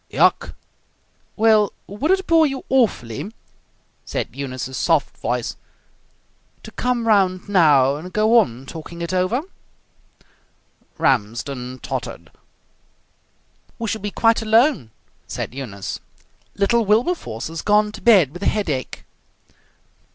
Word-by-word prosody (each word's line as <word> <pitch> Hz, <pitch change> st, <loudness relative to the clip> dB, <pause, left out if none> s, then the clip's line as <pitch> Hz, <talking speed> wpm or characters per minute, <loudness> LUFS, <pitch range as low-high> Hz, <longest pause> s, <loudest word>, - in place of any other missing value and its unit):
"Yuk!" -, -, +2 dB, 0.8 s
"Well, 215 Hz, -2 st, +3 dB
would 210 Hz, -, -3 dB
it 380 Hz, 0 st, +2 dB
bore 325 Hz, -3 st, +4 dB
you 270 Hz, -1 st, -5 dB
awfully," 195 Hz, -, 0 dB, 0.7 s
said -, -, -4 dB
Eunice's 130 Hz, -1 st, -5 dB
soft 165 Hz, -1 st, +1 dB
voice, 120 Hz, 0 st, -2 dB, 1.1 s
"to -, -, -10 dB
come 245 Hz, -2 st, -1 dB
round 190 Hz, -3 st, +2 dB
now 145 Hz, -8 st, +4 dB
and 180 Hz, +4 st, -9 dB
go 215 Hz, +4 st, +4 dB
on 130 Hz, -, -2 dB
talking 170 Hz, +3 st, -8 dB
it 170 Hz, -, -4 dB
over?" 185 Hz, +9 st, 0 dB, 1.5 s
Ramsden 125 Hz, +1 st, -1 dB
tottered. -, -, -5 dB, 1.5 s
"We 230 Hz, -, -4 dB
shall 220 Hz, 0 st, -3 dB
be 205 Hz, -, -3 dB
quite 225 Hz, +2 st, +2 dB
alone," 225 Hz, -, +3 dB, 0.4 s
said -, -, -5 dB
Eunice. 105 Hz, -8 st, -6 dB, 0.6 s
"Little 230 Hz, +4 st, +2 dB
Wilberforce 215 Hz, -, 0 dB
has 165 Hz, -1 st, -5 dB
gone 210 Hz, 0 st, +3 dB
to -, -, -10 dB
bed 195 Hz, -, +5 dB
with 175 Hz, -, -9 dB
a -, -, 0 dB
headache." 155 Hz, -, -2 dB
190 Hz, 115 wpm, -21 LUFS, 135-225 Hz, 1.5 s, bed